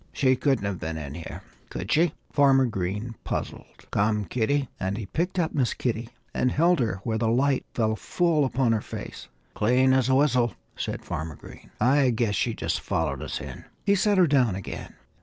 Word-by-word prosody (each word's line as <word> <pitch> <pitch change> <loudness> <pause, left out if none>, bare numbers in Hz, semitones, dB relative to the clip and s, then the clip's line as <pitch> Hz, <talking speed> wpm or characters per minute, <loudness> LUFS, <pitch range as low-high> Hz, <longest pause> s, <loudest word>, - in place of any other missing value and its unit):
"She 130 -2 +3
couldn't 135 -5 +1
have 100 -2 -2
been 80 0 -4
in 70 -3 -6
here, 80 +1 -8 0.3
could 95 - -5
she?" 165 0 +3 0.2
Farmer 135 -2 +5
Green 105 +1 -3
puzzled. - - -5
"Come, 105 0 +1
Kitty!" 130 - 0
And 95 +2 -2
he 110 - -4
picked 175 - -2
up 165 -3 0
Miss 130 -5 +1
Kitty 115 -1 -2 0.2
and 125 - +1
held 170 +3 +3
her 105 -6 -1
where 110 -2 -1
the 115 - +1
light 130 +4 +2
fell 110 -2 +1
full 165 - +1
upon 130 -2 +1
her 110 -2 +1
face. - - -8 0.3
"Clean 125 +4 +3
as 130 -1 +2
a 130 - +4
whistle!" 125 -6 +3 0.2
said - - -4
Farmer 80 -1 -4
Green. - - -14
"I 135 +1 +4
guess 115 -3 +1
she 120 -1 0
just - - -2
followed 75 -5 -1
us - - -4
in." - - -8 0.2
He 200 - +4
set 200 +1 +2
her 185 - +6
down 130 - +3
again. 95 - -7
120 Hz, 195 wpm, -26 LUFS, 105-140 Hz, 0.3 s, her